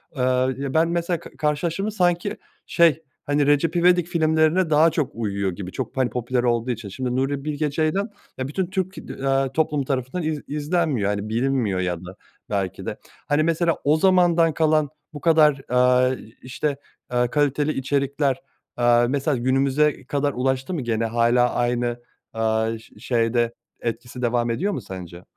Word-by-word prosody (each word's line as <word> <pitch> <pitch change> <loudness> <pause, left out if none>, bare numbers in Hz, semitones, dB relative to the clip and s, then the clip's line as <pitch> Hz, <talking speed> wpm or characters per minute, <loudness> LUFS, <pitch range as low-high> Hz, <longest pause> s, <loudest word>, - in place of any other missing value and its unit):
aaa, 130 -1 +2 0.2
ben 160 +1 +4
mesela 170 0 -1
k - - -12
karşılaştırdım 160 +5 -1
mı 215 - -1
sanki, 175 -4 0 0.3
şey, 165 -2 +3 0.2
hani, 145 0 +2
Recep 145 +3 +2
İvedik 175 0 +4
filmlerine 160 +1 +2
daha 155 +2 +5
çok 155 -3 -1
uyuyor 100 -4 -1
gibi 90 +1 -7
çok, 130 +3 -5
hani, 130 -2 +2
popüler 125 0 -1
olduğu 120 0 +1
için 115 -3 -5
şimdi 125 +4 -3
Nuri 135 +1 -1
Bilge 150 0 -1
Ceylan 160 +8 0 0.3
ya, 130 - -3
bütün 180 +6 -2
Türk, 190 0 -3 0.3
aaa, 135 -1 +1
toplumu 150 -1 0
tarafından 130 +5 -2
iz 155 -2 -2
izlenmiyor, 150 - 0
hani, 105 +1 -2
bilinmiyor 115 -4 0
ya 90 -1 -1
da 95 +2 -9 0.3
belki 100 -3 -2
de, - - -4 0.3
hani, 145 +1 +2
mesela 165 +1 +1
o 150 +2 +3
zamandan 175 -2 +4
kalan 155 -2 +2 0.2
bu 145 - -8
kadar, 155 -4 +4
aaa, 125 0 +4 0.3
işte, 140 +3 -3 0.3
aaa, 125 0 +1
kaliteli 145 +2 +1
içerikler, 140 0 0 0.4
aaa, 120 0 +4
mesela 140 0 0
günümüze 135 +4 +1
kadar 145 +1 -1
ulaştı 130 +6 -1
mı 165 - -2
gene 115 -2 -1
hâlâ 120 +2 +2
aynı, 120 0 0 0.3
aaa, 110 0 0
ş 110 -1 -18
şeyde 120 0 +1 0.3
etkisi 120 +2 -5
devam 120 -1 +1
ediyor 185 - -1
mu - - -3
sence? 90 -2 -9
135 Hz, 160 wpm, -23 LUFS, 120-155 Hz, 0.4 s, daha